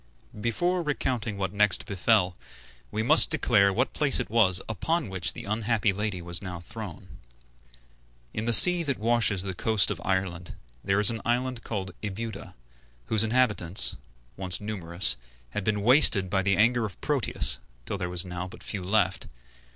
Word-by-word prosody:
Before 175 Hz, +11 st, -1 dB
recounting 125 Hz, -8 st, -3 dB
what 95 Hz, -1 st, -4 dB
next 105 Hz, -2 st, +1 dB
befell, 95 Hz, -2 st, 0 dB, 0.5 s
we 110 Hz, +1 st, -4 dB
must 155 Hz, +7 st, +8 dB
declare 105 Hz, -10 st, +2 dB
what 125 Hz, +7 st, -2 dB
place 145 Hz, -2 st, 0 dB
it -, -, -6 dB
was 100 Hz, -5 st, +3 dB
upon 160 Hz, -, -3 dB
which 95 Hz, -2 st, -3 dB
the -, -, -10 dB
unhappy 110 Hz, 0 st, -1 dB
lady 100 Hz, -3 st, -4 dB
was 85 Hz, 0 st, -3 dB
now 90 Hz, -3 st, -8 dB
thrown. 100 Hz, -1 st, -11 dB, 1.1 s
In 110 Hz, -, -5 dB
the 120 Hz, -, 0 dB
sea 175 Hz, -, +11 dB
that 140 Hz, -6 st, -3 dB
washes 110 Hz, -4 st, +1 dB
the 95 Hz, -1 st, -4 dB
coast 105 Hz, +2 st, +1 dB
of 90 Hz, -4 st, -6 dB
Ireland 95 Hz, -3 st, -4 dB, 0.3 s
there 95 Hz, +1 st, 0 dB
is 105 Hz, +2 st, +4 dB
an 115 Hz, -, -7 dB
island 125 Hz, 0 st, -2 dB
called 95 Hz, -4 st, -6 dB
Ebuda, 105 Hz, 0 st, -7 dB, 0.5 s
whose 110 Hz, -1 st, +1 dB
inhabitants, 105 Hz, -, 0 dB, 0.4 s
once 95 Hz, -1 st, -4 dB
numerous, 85 Hz, -, -3 dB, 0.3 s
had 105 Hz, -, -4 dB
been 105 Hz, 0 st, -2 dB
wasted 110 Hz, -7 st, +4 dB
by 95 Hz, -1 st, +1 dB
the 100 Hz, 0 st, 0 dB
anger 120 Hz, +2 st, +2 dB
of 105 Hz, -5 st, -7 dB
Proteus -, -, -1 dB, 0.3 s
till 100 Hz, -, -5 dB
there 90 Hz, -1 st, -4 dB
were 90 Hz, -, -7 dB
now 90 Hz, 0 st, -7 dB
but 110 Hz, +5 st, -14 dB
few 100 Hz, -4 st, -5 dB
left. 95 Hz, -1 st, -1 dB
105 Hz, 165 wpm, -25 LUFS, 95-115 Hz, 1.1 s, sea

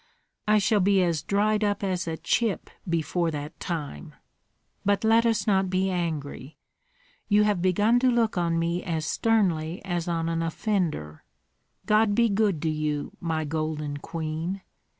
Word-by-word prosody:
"I 215 Hz, 0 st, +5 dB
shall 210 Hz, +1 st, +3 dB
be 195 Hz, 0 st, +4 dB
as 170 Hz, -4 st, 0 dB
dried 210 Hz, +4 st, +1 dB
up 205 Hz, 0 st, 0 dB
as 185 Hz, -3 st, -1 dB
a 160 Hz, 0 st, -2 dB
chip 220 Hz, -2 st, -1 dB, 0.2 s
before 170 Hz, +1 st, 0 dB
that 150 Hz, -1 st, -6 dB
time. 145 Hz, -, -5 dB, 0.7 s
But 200 Hz, +1 st, +1 dB
let 225 Hz, +1 st, +4 dB
us 220 Hz, -4 st, +1 dB
not 190 Hz, -3 st, +2 dB
be 190 Hz, +1 st, +1 dB
angry. 155 Hz, -5 st, -4 dB, 0.7 s
You 210 Hz, 0 st, +4 dB
have 205 Hz, -4 st, +1 dB
begun 205 Hz, +6 st, +3 dB
to 255 Hz, +1 st, +3 dB
look 235 Hz, -3 st, +2 dB
on 170 Hz, -2 st, +1 dB
me 170 Hz, +1 st, 0 dB
as 160 Hz, -3 st, -2 dB
sternly 175 Hz, -5 st, +1 dB
as 175 Hz, -2 st, -2 dB
on 165 Hz, -1 st, -1 dB
an 165 Hz, 0 st, -1 dB
offender. 165 Hz, -, -2 dB, 0.6 s
God 215 Hz, -1 st, +3 dB
be 235 Hz, 0 st, +4 dB
good 200 Hz, -6 st, +1 dB
to 160 Hz, -, +1 dB
you, 150 Hz, -1 st, -2 dB
my 160 Hz, -2 st, -2 dB
golden 150 Hz, -1 st, -3 dB
queen! 165 Hz, +5 st, -4 dB
175 Hz, 155 wpm, -26 LUFS, 160-205 Hz, 0.7 s, I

